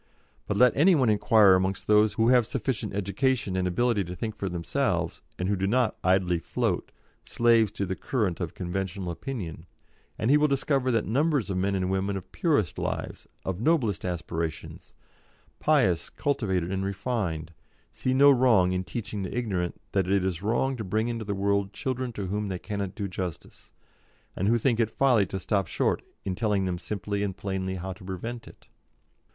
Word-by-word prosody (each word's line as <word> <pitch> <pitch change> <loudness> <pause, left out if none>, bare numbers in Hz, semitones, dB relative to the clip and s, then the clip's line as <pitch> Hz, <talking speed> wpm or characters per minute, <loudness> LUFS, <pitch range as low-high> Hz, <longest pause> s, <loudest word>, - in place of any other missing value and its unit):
But 100 - -1
let 125 +1 +5
any 170 +6 +5
one 130 -7 +3
inquire 105 -1 +5
amongst 95 +1 0
those 105 0 +4
who 115 +1 +2
have 125 -3 +5
sufficient 125 -7 -2
education 105 +1 0
and 90 -1 +1
ability 115 +2 +1
to 90 +1 -6
think 110 +2 -4
for 100 - -3
themselves, 85 -2 -1 0.2
and 90 - -2
who 100 - +1
do 95 0 -1
not 125 +2 +2
idly 90 -2 +2
float, - - -2 0.3
slaves 115 -3 +3
to 100 - -2
the 95 0 -3
current 105 -9 -1
of 85 -2 -4
conventional 95 0 -3
opinion, 85 - -6 0.5
and 110 +5 +1
he 145 - +7
will 150 0 +4
discover 135 -1 +1
that 115 -3 +1
numbers 140 - +1
of 95 - -1
men 100 +2 0
and 95 -1 -1
women 95 +1 0
of 95 0 -10
purest 145 - 0
lives, - - -4 0.2
of 95 +1 -3
noblest 125 - +1
aspirations, 85 -3 -4 0.7
pious, 100 - +2
cultivated, 95 - -1
and 95 0 -1
refined, 95 -5 -2 0.4
see 130 - -2
no 140 +1 +7
wrong 120 -9 +4
in 90 0 -1
teaching 105 0 -5
the 95 +5 -4
ignorant 95 -8 -2
that 95 -2 +1
it 95 -1 +2
is 90 -2 -2
wrong 120 +6 0
to 110 - -4
bring 110 +4 0
into 115 -2 -4
the 100 0 -2
world 100 0 0
children 130 -2 -3
to 105 -3 -5
whom 105 +3 -2
they 95 -2 -3
cannot 100 0 -4
do 100 -2 -3
justice, 90 -3 -7 0.6
and 95 - -1
who 115 +2 +4
think 120 0 +1
it 115 -2 +2
folly 120 -5 +3
to 95 - -4
stop 100 -1 0
short - - 0 0.2
in 95 - -1
telling 105 -1 0
them 90 -1 -2
simply 100 +1 -3
and 100 -2 -2
plainly 95 -1 -3
how 95 +1 -5
to 95 +1 -15
prevent 115 +6 -6
it. - - -16
100 Hz, 185 wpm, -27 LUFS, 95-120 Hz, 0.7 s, he